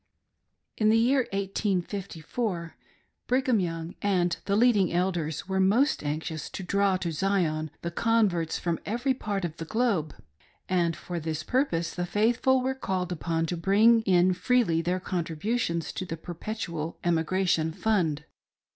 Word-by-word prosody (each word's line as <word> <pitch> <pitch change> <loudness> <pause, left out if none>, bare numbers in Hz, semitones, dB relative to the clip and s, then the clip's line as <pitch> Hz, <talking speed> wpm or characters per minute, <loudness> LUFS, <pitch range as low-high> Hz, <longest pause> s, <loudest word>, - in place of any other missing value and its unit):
In 215 -1 +3
the 225 - +5
year 250 +3 +3
1854, 195 -1 -2 0.5
Brigham 255 -2 +2
Young 165 -1 -3
and 180 -4 +1
the 200 - +1
leading 210 -5 +4
Elders 170 -3 -1
were 190 0 0
most 220 - +3
anxious 155 +1 -3
to 190 - -6
draw 200 +1 +2
to 175 -2 -3
Zion 160 -3 0
the 170 - -2
converts 195 -6 +1
from 170 -2 -2
every 245 +5 0
part 205 -6 -3
of 165 -1 -6
the 165 - -5
globe; 200 - 0 0.5
and 170 -3 +1
for 175 -1 -5
this 160 -1 -3
purpose 175 - 0
the 175 0 -3
faithful 240 +6 +2
were 265 +1 0
called, 190 -8 -3
upon 165 -1 -1
to 175 - -2
bring 210 +6 +4
in 185 -3 +3
freely 180 -3 +2
their 180 +2 -1
contributions 170 +1 -2
to - - -4
the 165 -3 -5
Perpetual 170 -2 -5
Emigration 170 -1 +1
Fund. 165 -6 0
185 Hz, 145 wpm, -27 LUFS, 165-215 Hz, 0.5 s, the